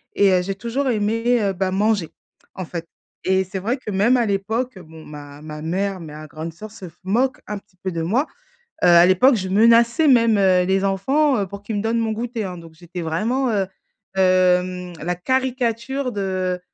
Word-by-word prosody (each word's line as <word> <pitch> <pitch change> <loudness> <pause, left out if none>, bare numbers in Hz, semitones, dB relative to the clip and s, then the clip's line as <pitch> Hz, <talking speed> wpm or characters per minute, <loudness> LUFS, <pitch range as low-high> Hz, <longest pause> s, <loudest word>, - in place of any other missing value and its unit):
et 200 -1 +4
heu, 180 - +3
j'ai 195 +1 -3
toujours 245 +6 -2
aimé, 230 +2 +1
heu, 195 -1 0
bah, 185 0 -1
manger, 200 -3 +1 0.5
en 185 -2 -5
fait 170 0 -6 0.4
et 190 0 +2
c'est 190 +1 -5
vrai 235 +8 -1
que 235 - -9
même 210 +6 +3
à 240 - +2
l'époque, 220 +4 -2
bon, 160 -2 -13
ma 145 -1 -11
ma 150 0 -8
mère, 185 +3 -2
ma 155 -1 -9
grande 160 +2 -6
sœur 210 +6 -10
se 190 -5 -10
f 165 - -26
moquent 250 +7 +1
un 210 - -4
petit 200 -2 -18
peu 190 - -2
de 165 -2 -3
moi, 230 - +1 0.6
heu, - - +6
à 175 0 +7
l'époque, 245 +9 +5
je 190 -3 -2
menaçais 230 +8 +4
même, 230 -5 +5
heu, 185 -2 +4
les 190 +1 +1
enfants, 265 +8 +2
heu, 195 - -1
pour 200 +1 -9
qu'ils 220 - -4
me - - -2
donnent 230 +1 0
mon 225 -1 0
goûter, 230 0 -3
hein, 180 -2 -6
donc 165 -1 -13
j'étais 175 +2 -8
vraiment, 230 +11 0
heu, 200 -3 0 0.5
hem, 180 -1 +2
la 175 +1 -2
caricature 255 +3 -1
de 185 -2 -2
195 Hz, 205 wpm, -21 LUFS, 180-230 Hz, 0.6 s, à